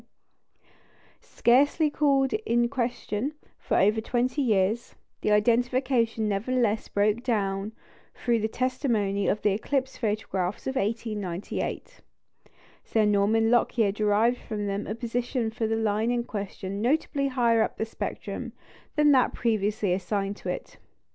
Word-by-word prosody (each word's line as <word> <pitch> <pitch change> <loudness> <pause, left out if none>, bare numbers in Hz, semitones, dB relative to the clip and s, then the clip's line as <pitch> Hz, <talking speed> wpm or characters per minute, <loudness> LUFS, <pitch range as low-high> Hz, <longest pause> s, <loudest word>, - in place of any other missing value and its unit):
Scarcely 290 +5 +2
called 275 -3 +2
in 240 - +1
question 245 +1 -2 0.2
for - - 0
over 210 +3 +3
twenty 250 +5 0
years, 215 -1 +1 0.3
the - - 0
identification 235 +1 +2
nevertheless 220 +1 0
broke 210 +3 +1
down 205 -4 -1 0.4
through 235 -2 +1
the 220 - 0
testimony 225 -6 0
of 210 - 0
the 210 - +3
eclipse 260 +6 -1
photographs 205 -4 -2
of 265 - -2
1898. 210 - -3 0.8
Sir 220 -2 +1
Norman 210 +2 +3
Lockyer 235 -3 +3
derived 215 +4 +2
from 210 -2 -4
them 200 +1 -3
a 215 - -3
position 235 0 -2
for 225 0 -2
the 225 - 0
line 220 0 0
in 240 -1 0
question 200 -2 -5
notably 280 +2 +1
higher 235 -4 +2
up - - 0
in - - +1
the - - -2
spectrum 225 - -5 0.4
than 300 -1 +5
that 260 -3 +3
previously 210 -4 0
assigned 195 +2 -2
to - - -6
it. - - -6
225 Hz, 135 wpm, -27 LUFS, 205-250 Hz, 0.8 s, than